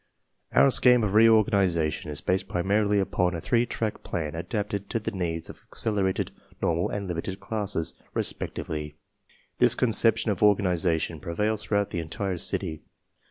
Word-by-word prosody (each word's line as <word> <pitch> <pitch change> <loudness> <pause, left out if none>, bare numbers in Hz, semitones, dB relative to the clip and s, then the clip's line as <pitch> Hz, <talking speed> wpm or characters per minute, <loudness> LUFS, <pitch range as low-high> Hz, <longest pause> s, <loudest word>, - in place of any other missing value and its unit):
/ - - -49
Our 140 - +6
scheme 125 -2 +5
of 100 -2 -1
reorganization 100 -9 +3
is 75 - -4
based 95 +1 0
primarily 100 +3 +1
upon 90 -2 0
a - - -3
three 120 +7 +1
track 110 -1 -3
plan 80 -3 -4
adapted 100 +3 -4
to 115 - -1
the 115 +1 -4
needs 85 -5 -3
of - - -11
accelerated, 100 -4 -1 0.3
normal, 85 +1 0
and 100 -1 -4
limited 90 +3 -4
classes, 105 -7 -2 0.2
respectively. 75 -1 -3 0.6
This - - +6
con 125 - +1
ception 115 0 +3
of 95 - -4
organization 90 -6 +2
prevails 105 +7 -2
throughout 100 -1 -1
the 85 - -2
entire 90 +3 -3
city. 80 -1 -1
95 Hz, 155 wpm, -26 LUFS, 85-105 Hz, 0.6 s, Our